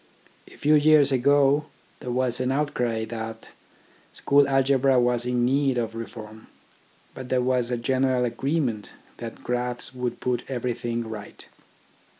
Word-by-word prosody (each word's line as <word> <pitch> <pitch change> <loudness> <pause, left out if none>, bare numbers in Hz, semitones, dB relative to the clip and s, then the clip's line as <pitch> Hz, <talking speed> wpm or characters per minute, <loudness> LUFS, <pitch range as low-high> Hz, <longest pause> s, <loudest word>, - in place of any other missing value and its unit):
A - - -16
few 150 +1 +2
years 150 -1 +5
ago 140 +2 +3 0.3
there 125 - -7
was 125 0 -1
an 130 0 0
outcry 125 -6 -1
that 115 0 -7 0.6
school 140 0 +3
algebra 135 -1 +3
was 120 0 +1
in 125 -1 +1
need 135 0 +1
of 115 -2 -2
reform, 110 -1 -9 0.7
but 130 -1 -9
there 130 - +2
was 125 -1 +1
a 125 - -1
general 130 +1 +1
agreement 125 -4 -2 0.3
that 115 -1 -8
graphs 125 +1 -2
would 125 -1 -4
put 125 -1 -1
everything 120 -2 -3
right. 105 -2 -9
125 Hz, 140 wpm, -25 LUFS, 120-135 Hz, 0.7 s, years